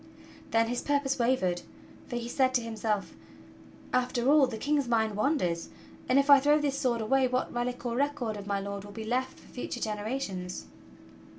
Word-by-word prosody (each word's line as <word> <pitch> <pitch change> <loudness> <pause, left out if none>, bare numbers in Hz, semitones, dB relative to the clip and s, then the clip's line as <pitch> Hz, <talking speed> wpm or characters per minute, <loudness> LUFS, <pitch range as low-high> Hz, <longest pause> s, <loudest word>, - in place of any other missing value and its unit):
Then 225 0 +3
his 245 +1 -2
purpose 280 -2 0
wavered, 190 -8 +1 0.5
for 245 - -5
he 240 -1 -3
said 260 +1 +2
to 245 - +3
himself: 220 -2 -2 0.8
"After 250 +1 +2
all, 295 -3 +6
the 230 -3 -5
King's 285 +2 0
mind 220 -3 +1
wanders; 205 - 0 0.4
and 255 - +4
if 280 0 +4
I 280 -1 +9
throw 295 +2 +4
this 285 -2 0
sword 245 -4 0
away 260 +4 +3
what 255 0 -1
relic 245 +1 -3
or 235 -1 -1
record 270 -5 -1
of 200 -1 -8
my 200 -1 0
Lord 200 0 -5
will 205 - -10
be 220 - -6
left 250 +4 -2
for - - -18
future 245 -1 -5
genera 215 +3 -2
tions?" 180 -7 -5
245 Hz, 190 wpm, -29 LUFS, 215-270 Hz, 0.8 s, I